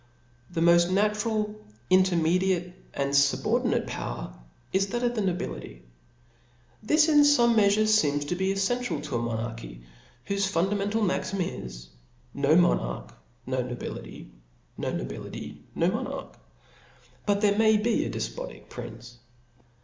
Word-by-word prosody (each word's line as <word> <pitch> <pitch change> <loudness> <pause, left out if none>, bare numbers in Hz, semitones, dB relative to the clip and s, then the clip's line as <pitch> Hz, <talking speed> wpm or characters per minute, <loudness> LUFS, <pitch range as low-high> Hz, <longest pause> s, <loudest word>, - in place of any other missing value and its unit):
The 165 - -3
moft 170 +1 +5
natural, 210 +1 0 0.3
intermediate 180 0 +2 0.2
and 140 0 -2
fubordinate 140 0 +2
power, - - -5 0.4
is 195 +1 +2
that 240 +4 -3
of 240 0 +1
the 220 - -1
nobility. 175 - -4 1.0
This 305 +8 +4
in 300 -2 +5
fome 250 -5 +5
mea 210 -2 +5
fure 215 +2 +3
feems 145 -10 +2
to 180 - -1
be 190 +1 0
effential 195 -5 -1
to 145 -5 -2
a - - -1
monarchy, 115 - -5 0.4
whofe 200 0 0
fundamental 200 +5 0
maxim 195 0 -1
is, - - -6 0.4
no 140 +2 +3
monarch, 60 - +1 0.3
no 130 0 -1
nobility 120 - -7 0.2
\ - - -36
no - - -2
nobility, - - -6
no - - +2
monarch - - -4
5 - - -25 0.9
but 205 0 +2
there 205 0 +3
may 220 -1 +5
be 220 +2 +1
a - - -3
defpotic - - -6
prince. 120 0 -9
185 Hz, 135 wpm, -27 LUFS, 140-210 Hz, 1.0 s, moft